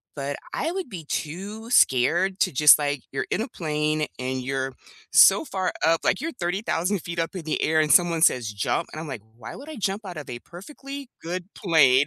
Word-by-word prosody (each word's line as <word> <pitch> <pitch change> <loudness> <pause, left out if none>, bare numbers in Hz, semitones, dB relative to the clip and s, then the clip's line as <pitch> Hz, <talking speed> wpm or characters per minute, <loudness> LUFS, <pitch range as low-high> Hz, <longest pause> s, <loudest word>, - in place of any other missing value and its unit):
but 140 0 -4 0.2
I 325 - -1
would 375 0 -4
be 175 -6 -7
too 200 +10 -5
scared 175 - +3
to, - - +3
just, 150 +2 +7
like 145 -2 -1
you're 135 -1 -3
in 210 - 0
a 230 - -2
plane, 155 -3 -1
and 130 0 -2
you're 135 0 -2 0.4
so - - +7
far 190 -6 -2
up, 165 0 +3
like, - - +1
you're 330 +1 -3
30,000 185 -1 -1
feet 170 +1 -7
up 165 +4 -2
in 180 - -5
the 155 - -1
air 160 0 +2
and 150 -2 +1
someone 170 -1 +4
says, 120 -4 +3
"Jump," 100 - -1
and 155 - -6
I'm, 160 - -7
like, 135 -7 -6 0.2
"Why 115 -2 -9
would 285 - -11
I 310 - -8
jump 200 +1 -2
out 180 -4 -7
of 145 - -8
a 120 - -5
perfectly 275 - -10
good 175 +1 -4
plane?" 145 -7 +4
165 Hz, 215 wpm, -24 LUFS, 145-195 Hz, 0.4 s, just